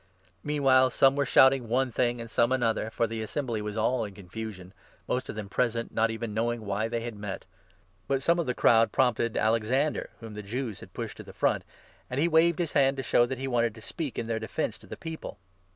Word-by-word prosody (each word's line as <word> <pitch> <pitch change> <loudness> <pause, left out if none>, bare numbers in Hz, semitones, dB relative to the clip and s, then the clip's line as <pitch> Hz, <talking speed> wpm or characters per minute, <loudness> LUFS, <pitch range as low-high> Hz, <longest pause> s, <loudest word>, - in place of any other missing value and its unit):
Meanwhile 135 -3 +4
some 135 +1 +4
were 140 -1 0
shouting 130 -3 +5
one 130 +2 +1
32 - - -23
thing 120 -1 +1
and 115 - -7
some 115 +3 +2
another, 115 -4 +1
for 115 - 0
the 115 0 -4
Assembly 115 -1 -3
was 105 +1 -5
all 120 +3 +1
in 100 -2 -7
con 95 -3 -13
fusion, 100 -3 -7 0.3
most 125 - -2
of - - -5
those 105 -2 -5
present 115 0 -1
not 115 +1 +2
even 115 -1 -4
knowing 115 +1 -1
why 100 +2 -1
they 115 0 -2
had 115 -1 -5
met. 105 -2 -6 0.6
But 135 -1 0
some 170 +3 +3
of 170 - -1
the 125 - -1
crowd 115 0 +4
prompted 120 -3 +1
Alexander, 115 +7 +1
whom 115 -2 -9
the 105 - -6
33 110 +5 -4
Jews 115 -7 -4
had - - -13
pushed - - -5
to - - -8
the - - -12
front, - - +1 0.5
and 125 - -2
he 165 - +3
waved 165 0 +4
his 170 -4 -2
hand 135 -1 +3
to 135 - -3
show 120 0 +3
that 130 +1 -4
he 135 +1 -4
wanted 120 -3 +1
to 110 - -12
speak 145 +4 -5
in - - -2
their 115 -1 -2
defence 110 - -3
to - - -16
the - - -8
people. 160 -1 -7
120 Hz, 240 wpm, -28 LUFS, 110-135 Hz, 0.6 s, shouting